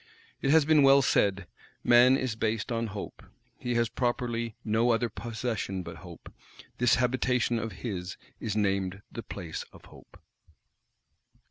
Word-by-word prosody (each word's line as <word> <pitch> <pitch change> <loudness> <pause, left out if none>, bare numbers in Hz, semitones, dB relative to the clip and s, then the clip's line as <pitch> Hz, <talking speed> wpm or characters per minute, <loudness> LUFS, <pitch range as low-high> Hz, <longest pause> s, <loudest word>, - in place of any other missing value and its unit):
It 135 - 0
has 155 0 +5
been 155 -1 +5
well 135 0 +6
said: 100 -5 +2 0.4
"Man 125 +2 +6
is 130 -5 -2
based 110 +1 -2
on 115 0 -1
Hope; 105 -1 -7 0.4
he 125 -1 -2
has 120 0 +2
properly 120 -1 -2
no 110 +2 +2
other 115 0 +2
possession 110 -5 -4
but 85 -1 -8
Hope; - - -12 0.5
this 125 -1 +4
habitation 125 -1 +1
of 115 0 -4
his 90 -5 -4 0.2
is 110 -2 -3
named 100 -1 -1
the 115 - -6
Place 90 -6 -6
of - - -16
Hope." - - -17
115 Hz, 145 wpm, -28 LUFS, 105-125 Hz, 0.5 s, well